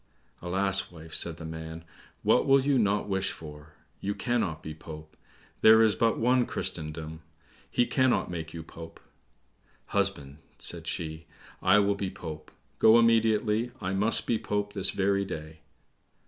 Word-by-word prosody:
"Alas, 95 +2 +1
wife," 80 -1 -12
said 85 -2 -1
the 80 - -8
man, 80 0 -7 0.4
"what - - +3
will 135 0 +6
you 140 -3 +3
not 105 -2 +1
wish 95 -1 0
for? 75 -1 -11 0.3
You 100 +1 -3
cannot 110 -11 -1
be 80 - -6
Pope. 80 0 -11 0.5
There 110 +1 +8
is 110 -2 +4
but 115 +2 +1
one 125 +3 +3
in 120 - +2
Christendom. 80 +1 -4 0.5
He 120 - +2
cannot 130 -1 +2
make 80 -2 -5
you 85 -1 -7
Pope." 80 +1 -11 0.9
"Husband," 70 +1 -1 0.2
said 85 -1 -1
she, 80 -1 -4 0.3
"I 95 +2 +5
will 100 0 +3
be 100 -1 -3
Pope; 80 -4 -8 0.3
go 110 +1 +7
immediately, 115 0 +3
I 95 -2 -3
must 110 +3 +1
be 115 - 0
Pope 105 0 -2
this 95 -2 +2
very 100 0 +1
day." 80 -4 -7
95 Hz, 155 wpm, -28 LUFS, 80-110 Hz, 0.9 s, There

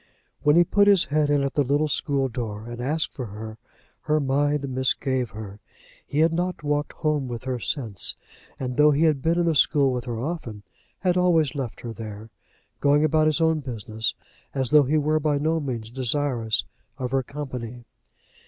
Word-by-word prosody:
When 150 +1 +4
he 175 - +7
put 200 +4 +3
his 200 -3 +6
head 150 0 +1
in 145 -1 +2
at 140 - -2
the 145 - +2
little 145 +3 +1
school 140 -2 0
door 110 -3 -5
and 120 0 -6
asked 150 +5 -1
for 125 -4 -5
her, 110 +2 -8 0.4
her 155 0 +1
mind 145 +1 +1
misgave 130 -1 0
her. 105 -1 -9 0.5
He 150 - 0
had 165 +1 +3
not 180 -1 -2
walked 145 0 -1
home 150 -4 -1
with 120 -2 -6
her 130 -1 -3
since, 115 - 0 0.4
and 125 -1 -4
though 150 0 +6
he 150 +2 +2
had 155 -4 +3
been 165 +3 +1
in 175 - +2
the 165 - +2
school 140 -2 +3
with 125 0 -3
her 120 -3 -4
often, 125 -8 -5 0.4
had 180 -2 +2
always 165 -6 +3
left 135 -5 -5
her 115 -1 -6
there, 110 -1 -8 0.5
going 145 +1 +3
about 155 0 +3
his 155 +1 +1
own 160 -1 +3
business, 110 -4 -3 0.4
as 130 -3 0
though 150 -2 +6
he 150 +4 +2
were 155 +1 +2
by 150 -1 +1
no 160 +3 +1
means 120 -6 -5
desirous 125 -3 0 0.3
of 125 -1 -4
her 135 0 +2
company. 125 -4 -7
140 Hz, 190 wpm, -24 LUFS, 120-155 Hz, 0.5 s, he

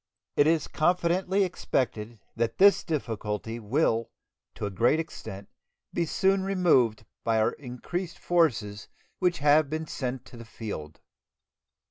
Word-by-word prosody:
It 145 - +4
is 160 -2 +2
confidently 180 +4 +1
expected 120 - -2 0.2
that 115 0 -1
this 200 +1 +6
difficulty 115 - -3
will 115 0 +1 0.5
to - - -4
a 100 - -3
great 120 - +3
extent 100 -11 -7 0.5
be 170 -1 0
soon 190 +4 +2
removed 165 - +2 0.2
by 115 -1 +2
our 110 - +3
increased 160 +7 -6
forces 120 -12 +1 0.3
which 180 -2 +2
have 150 0 +5
been 160 +1 -3
sent 130 -4 -4
to 120 - -13
the 115 - -9
field. 100 -9 -7
135 Hz, 130 wpm, -27 LUFS, 115-170 Hz, 0.5 s, this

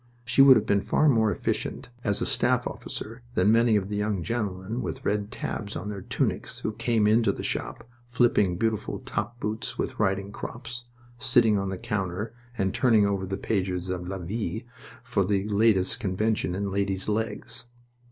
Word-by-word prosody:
She 115 +4 +4
would 135 -1 +10
have 105 - 0
been 100 -2 +2
far 155 - +2
more 110 -6 +4
efficient 120 - -3
as 100 -2 +1
a - - 0
staff - - +2
officer 115 +3 -6
than 95 +4 +4
many 115 0 +4
of 100 -2 +1
the 105 - -3
young 105 -3 -1
gentlemen 105 +2 -2
with - - -5
red 105 0 0
tabs 105 -4 -4
on 105 - -4
their 100 -2 -5
tunics - - -2
who 110 - -1
came 115 -1 +1
into 110 +2 +4
the - - -6
shop, 115 -1 -4 0.2
flipping 120 -7 +3
beautiful 110 +1 -1
top 120 +4 -3
boots 110 +1 -3
with - - -3
riding 100 -1 +1
crops, 120 +2 -6 0.3
sitting 115 -4 +4
on 100 -1 0
the 95 - -3
counter, 100 +3 -3 0.2
and 95 -2 0
turning 110 -5 +4
over 100 -2 -1
the 95 +1 -3
pages 95 -3 -1
of 90 -1 -4
La 95 +1 -3
Vie 105 +5 -3 0.4
for 120 -5 +1
the 100 +1 0
latest 100 -2 +3
convention 105 -2 0
in 100 0 -2
ladies' 95 -1 -1
legs. 110 +2 -2
105 Hz, 180 wpm, -27 LUFS, 95-115 Hz, 0.4 s, would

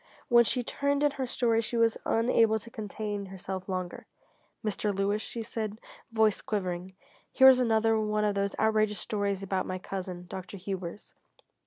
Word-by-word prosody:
When 235 -1 +7
she 250 +2 +1
turned 280 +3 0
in 295 - +4
her 270 -2 -3
story 230 -2 +2
she 235 +1 -3
was 230 -1 +3
unable 225 -1 +3
to 230 +2 -10
contain 210 -2 -4
herself 190 0 -6
longer. 185 -1 -4 0.6
"Mr. 210 0 0
Lewis," 200 +2 0
she 230 0 -5
said, 215 -2 -4 0.3
voice 220 -2 +3
quivering, 185 -2 -3 0.4
"here 265 -1 +8
is 255 -1 +6
another 225 -2 +3
one 210 0 0
of 205 - +2
those 200 0 -1
outrageous 215 -1 +2
stories 200 -2 -2
about 190 -1 -1
my 185 - -3
cousin, 185 -1 -6
Dr. 190 +2 -7
Hubers. 190 0 -6
210 Hz, 165 wpm, -29 LUFS, 195-225 Hz, 0.6 s, here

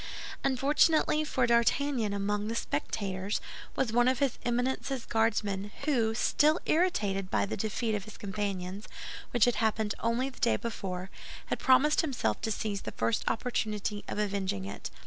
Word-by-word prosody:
Unfortunately 300 +3 +3
for 260 -4 +1
D'Artagnan, 235 0 +2
among 205 +1 -1
the 230 - -2
spectators 195 +3 -2 0.4
was 235 -4 0
one 240 +1 +4
of 260 0 +3
his 275 -3 0
Eminence's 250 +1 -1
Guardsmen, 210 -3 0
who, 235 -7 +2
still 305 +7 +3
irritated 205 - +1
by - - +2
the - - -3
defeat 220 +2 -1
of 205 -2 -2
his 215 - -11
companions, 200 -1 -4 0.4
which 240 -3 +4
had 245 - +1
happened 220 -2 +1
only 230 +3 +1
the - - -16
day 235 - +3
before, 190 -5 -5 0.3
had - - -2
promised 265 +4 +5
himself 245 - -1
to 220 - -1
seize 205 -1 -2
the - - -6
first 115 0 0
opportunity 215 -3 -2
of - - -4
avenging 195 - -1
it. 100 - -6
220 Hz, 155 wpm, -30 LUFS, 200-255 Hz, 0.4 s, promised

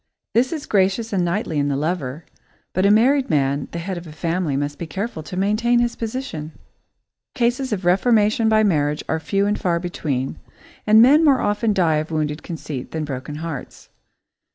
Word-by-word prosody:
This 245 +3 +2
is 310 -3 -4
gracious 200 +3 +1
and 185 -2 +1
knightly 170 -3 -1
in 145 - +1
the 140 - 0
lover, 150 -1 -3 0.5
but 185 +2 +2
a - - +4
married 255 +6 +4
man, 140 -2 +1
the - - -5
head 175 +1 -4
of 170 - -12
a - - -9
family, 165 -2 -1
must 145 +1 -3
be 170 - -5
careful 195 0 -4
to 180 +4 -8
maintain 215 +5 +2
his 240 0 +1
position. 220 - -5 0.8
Cases 250 +1 0
of 195 -4 -2
reformation 215 +3 +3
by 215 0 +4
marriage 150 -6 +1
are 160 - 0
few 195 +4 0
and 205 +1 0
far 170 -2 +1
between, 145 -7 -3 0.5
and 215 +2 +7
men 295 +6 +6
more 280 -4 +5
often 210 +1 +1
die 170 -6 +2
of 155 +1 -3
wounded 155 -1 -2
conceit 150 -6 -6
than 160 -1 -3
broken 140 +1 -6
hearts. 160 -2 -7
180 Hz, 185 wpm, -21 LUFS, 155-220 Hz, 0.8 s, and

